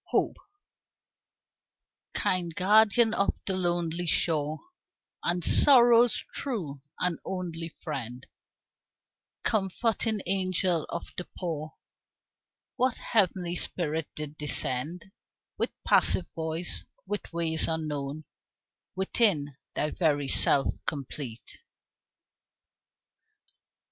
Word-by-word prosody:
Hope - - 0 1.8
Kind 175 -3 0
guardian 220 +4 +5
of 200 - +1
the 190 - -1
Lonely 175 -1 -1
Shore, 155 -2 +1 0.7
And 175 0 0
Sorrow's 240 -3 +6
true 180 - -4 0.2
and 180 -2 0
only 170 -3 -5
friend, 125 -4 -5 1.2
Comforting 215 +1 +1
angel 185 -3 +1
of 170 - -5
the 180 - -5
poor 155 -4 -4 1.0
What 255 -1 +1
heavenly 185 -5 +1
spirit 160 -3 -2
did 150 0 -6
descend 150 +5 -2 0.5
With - - +1 0.2
passive 180 - +4
voice, 160 +2 -4 0.2
with 205 +1 -5
ways 165 -1 0
unknown, 155 -2 -3 0.7
Within 190 - +1 0.2
thy 150 - 0
very 145 -5 +1
self 135 +1 +3
complete? 135 -5 -4
170 Hz, 85 wpm, -28 LUFS, 150-190 Hz, 1.8 s, Sorrow's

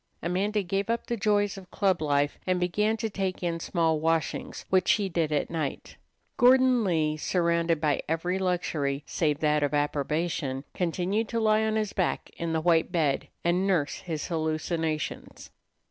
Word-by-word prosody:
Amanda 200 +4 0
gave 195 +3 -2
up 230 0 -1
the 240 - -2
joys 205 -2 +1
of 185 -1 -15
club 190 -5 +1
life, 145 -1 +1
and 185 -1 +2
began 210 +5 +1
to 225 0 -2
take 195 -3 -3
in 170 -1 -1
small 165 -2 +1
washings, 165 -1 -1
which 185 -1 +3
she 205 -3 +2
did 165 -3 0
at 150 +1 0
night. 155 -4 -4 0.4
Gordon 255 -1 +5
Lee, 155 -5 +1
surrounded 170 -1 +1
by 150 -3 +1
every 175 +4 -1
luxury 155 -6 -1
save 150 -3 -1
that 150 -1 +2
of 145 0 0
approbation, 145 -1 -1
continued 185 +5 -1
to 230 - -1
lie 215 -1 +3
on 220 0 0
his 215 -2 -1
back 185 - -1
in 170 -1 -2
the 160 0 0
white 165 0 +2
bed 155 -6 0 0.2
and 180 +3 +1
nurse 170 -7 +1
his 160 -4 -4
hallucinations. 160 -1 -3
170 Hz, 165 wpm, -27 LUFS, 155-195 Hz, 0.4 s, Gordon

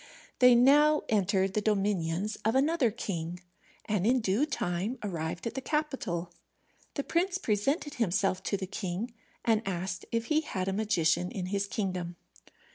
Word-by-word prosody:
They 250 -1 +8
now 295 +5 +5
entered 195 -2 +2
the 210 - +1
dominions 200 -2 0
of 220 +3 +1
another 285 -1 +3
king, 180 -6 -4 0.5
and 210 -4 0
in 255 +2 +4
due 220 +7 +1
time 195 - -2
arrived 170 -2 -3
at 230 - -2
the 265 - -4
capital. 260 - -2 0.6
The 280 - -1
prince 360 +4 0
presented 280 - 0
himself 195 -5 +1
to 200 - 0
the 190 - -4
king, 195 +4 -4 0.3
and 225 -2 +3
asked 185 -1 -3
if 230 0 0
he 310 +3 +2
had 185 -11 -3
a 195 - 0
magician 180 -4 +1
in 185 -3 -4
his 200 0 0
kingdom. 185 -4 -3
210 Hz, 155 wpm, -30 LUFS, 185-250 Hz, 0.6 s, They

